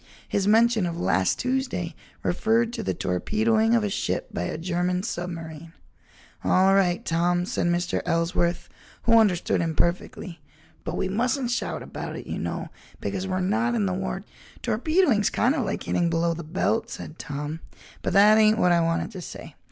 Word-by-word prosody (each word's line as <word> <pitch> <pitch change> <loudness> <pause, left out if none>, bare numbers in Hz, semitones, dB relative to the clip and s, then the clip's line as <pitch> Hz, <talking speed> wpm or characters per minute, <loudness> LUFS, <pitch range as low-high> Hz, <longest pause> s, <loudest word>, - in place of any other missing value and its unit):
His 200 -1 0
mention 225 -2 +4
of 170 0 -4
"last 95 - +2
Tuesday" 250 -10 -2 0.3
referred 225 +5 +1
to - - -3
the 95 - -2
torpedoing 220 - +1
of 230 - +2
a 205 - 0
ship - - -2
by 90 - -2
a - - -3
German 180 +2 -1
submarine. 165 -5 -6 0.7
"All 190 +1 +4
right, 180 -3 +2
Tom," 175 +1 +1
said 175 - -1
Mr. 175 +1 0
Ellsworth, 170 +1 0 0.4
who 230 -1 +6
understood 185 -7 +2
him 165 -1 -1
perfectly, 170 0 -2 0.4
"but - - -4
we - - 0
mustn't 245 +5 0
shout 245 - -2
about - - -6
it, - - -7
you - - -4
know, - - -4 0.3
because 190 0 -3
we're 185 0 -1
not 230 +6 +1
in 215 -3 +1
the 190 - 0
war—" 190 +1 -3 0.4
"Torpedoing's 245 - +2
kind 245 +5 +2
of 270 -7 -1
like 195 - -3
hitting 175 -1 +1
below 170 0 +1
the 170 +1 -6
belt," 195 +8 -1
said 155 - -8
Tom, 145 +2 -5 0.4
"but - - -1
that 210 +2 +7
ain't 215 0 +5
what 180 -5 +3
I 170 -1 +4
wanted 165 +5 0
to 190 -4 -7
say. - - -9
185 Hz, 175 wpm, -25 LUFS, 170-220 Hz, 0.7 s, that